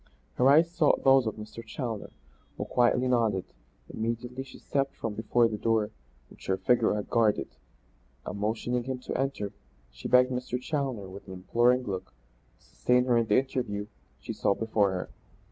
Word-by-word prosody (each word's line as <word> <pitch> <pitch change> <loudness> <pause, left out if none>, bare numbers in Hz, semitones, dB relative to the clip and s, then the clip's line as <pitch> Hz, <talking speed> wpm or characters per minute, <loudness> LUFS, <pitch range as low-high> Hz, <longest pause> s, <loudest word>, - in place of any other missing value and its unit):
Her 130 +2 +5
eyes 160 +4 +5
sought 160 -4 +2
those 135 -3 +5
of 110 - -2
Mr. 110 +2 -9
Challoner, 115 -1 -5 0.5
who - - -3
quietly 125 +1 +2
nodded. 115 -7 +1 0.4
Immediately 115 +3 -4
she 130 - -13
stepped 140 -1 -1
from 115 - -4
before 115 +2 +2
the 105 -2 -4
door 110 -2 +1 0.4
which - - -14
her 95 - +1
figure 110 +3 +2
had 105 - -3
guarded 110 -3 +2 0.8
and, 100 - -5
motioning 115 +3 -1
him 130 -1 -3
to 125 - -6
enter, 130 -7 -2 0.4
she - - -7
begged 125 0 +5
Mr. 125 0 -2
Challoner, 130 -7 -3
with 95 +2 -11
an 95 - -7
imploring 120 +7 +2
look, 95 -4 -5 0.4
to - - -29
sustain 125 0 +2
her 125 -2 +3
in 115 -1 +2
the 105 - +4
interview 125 -6 -1 0.3
she - - -6
saw 100 - +1
before 110 -3 +1
her. 90 -1 -4
115 Hz, 175 wpm, -28 LUFS, 105-125 Hz, 0.8 s, Her